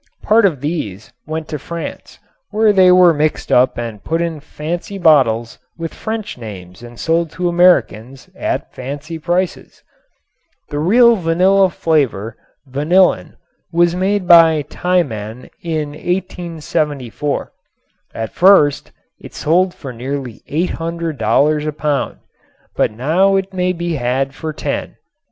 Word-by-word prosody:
Part 215 Hz, 0 st, +4 dB
of 150 Hz, -9 st, -4 dB
these 125 Hz, -, -4 dB
went 155 Hz, 0 st, -4 dB
to 150 Hz, -, -4 dB
France, 170 Hz, +4 st, -7 dB, 0.3 s
where 215 Hz, 0 st, +3 dB
they 185 Hz, -2 st, +6 dB
were 180 Hz, -2 st, +6 dB
mixed 155 Hz, 0 st, -1 dB
and 120 Hz, -4 st, +1 dB
put 165 Hz, +1 st, -1 dB
up 170 Hz, -, +1 dB
in 165 Hz, -2 st, -5 dB
fancy 165 Hz, +6 st, -6 dB
bottles 130 Hz, -10 st, +3 dB, 0.2 s
with 165 Hz, -1 st, -5 dB
French 220 Hz, -, -5 dB
names 95 Hz, -5 st, -10 dB
and 120 Hz, -1 st, -12 dB
sold 165 Hz, 0 st, 0 dB
to 180 Hz, -1 st, -2 dB
Americans 170 Hz, -8 st, +2 dB
at -, -, -3 dB
fancy 145 Hz, +5 st, -6 dB
prices. 175 Hz, +3 st, -3 dB, 0.9 s
The 145 Hz, -, -3 dB
real 235 Hz, +8 st, +5 dB
vanilla 185 Hz, +3 st, +3 dB
flavor, 130 Hz, -, -1 dB, 0.3 s
vanillin, 150 Hz, +8 st, +1 dB, 0.4 s
was 170 Hz, 0 st, +3 dB
made 190 Hz, +1 st, 0 dB
by 165 Hz, -3 st, +6 dB
Tiemann 125 Hz, -, -2 dB
in 155 Hz, -3 st, -2 dB
1874. 155 Hz, -5 st, -3 dB, 0.6 s
At 110 Hz, -1 st, -5 dB
first 175 Hz, -6 st, +4 dB, 0.3 s
it -, -, -12 dB
sold 180 Hz, +4 st, +2 dB
for 130 Hz, -4 st, -8 dB
nearly 130 Hz, 0 st, -5 dB
$800 160 Hz, -2 st, 0 dB
a -, -, 0 dB
pound, 150 Hz, -2 st, -2 dB, 0.6 s
but -, -, +2 dB
now 160 Hz, -, +2 dB
it 195 Hz, 0 st, -2 dB
may 180 Hz, 0 st, 0 dB
be 170 Hz, -2 st, -3 dB
had 135 Hz, +2 st, -1 dB
for 155 Hz, +3 st, -5 dB
$10. -, -, -4 dB
160 Hz, 130 wpm, -17 LUFS, 135-180 Hz, 0.9 s, they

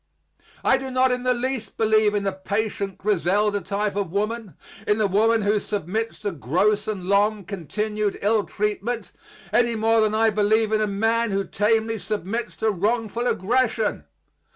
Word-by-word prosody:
I 265 Hz, -, +4 dB
do 265 Hz, 0 st, -5 dB
not 255 Hz, 0 st, +2 dB
in 250 Hz, 0 st, -1 dB
the 250 Hz, 0 st, +2 dB
least 240 Hz, -4 st, -4 dB
believe 215 Hz, -1 st, +3 dB
in 205 Hz, -, 0 dB
the 195 Hz, -, 0 dB
patient 200 Hz, 0 st, -3 dB
Griselda 205 Hz, +1 st, +1 dB
type 200 Hz, +2 st, -2 dB
of 200 Hz, -5 st, -2 dB
woman, 210 Hz, +1 st, -2 dB, 0.3 s
in 210 Hz, -, +3 dB
the 215 Hz, -, +2 dB
woman 220 Hz, +3 st, +2 dB
who 205 Hz, +1 st, +2 dB
submits 210 Hz, +3 st, -3 dB
to 205 Hz, -1 st, -2 dB
gross 190 Hz, -, 0 dB
and 200 Hz, -4 st, -3 dB
long 200 Hz, +1 st, +2 dB
continued 210 Hz, +3 st, -2 dB
ill 210 Hz, 0 st, +2 dB
treatment, 210 Hz, +2 st, -3 dB, 0.4 s
any 235 Hz, 0 st, +3 dB
more 225 Hz, +1 st, +3 dB
than 215 Hz, 0 st, +1 dB
I 225 Hz, 0 st, +3 dB
believe 215 Hz, +1 st, +2 dB
in 215 Hz, 0 st, +2 dB
a 215 Hz, -, +1 dB
man 225 Hz, +3 st, +1 dB
who 195 Hz, 0 st, -1 dB
tamely 220 Hz, +1 st, +1 dB
submits 215 Hz, +4 st, -3 dB
to 220 Hz, -, +1 dB
wrongful 225 Hz, +4 st, -1 dB
aggression. 230 Hz, +1 st, 0 dB
215 Hz, 165 wpm, -23 LUFS, 200-225 Hz, 0.4 s, I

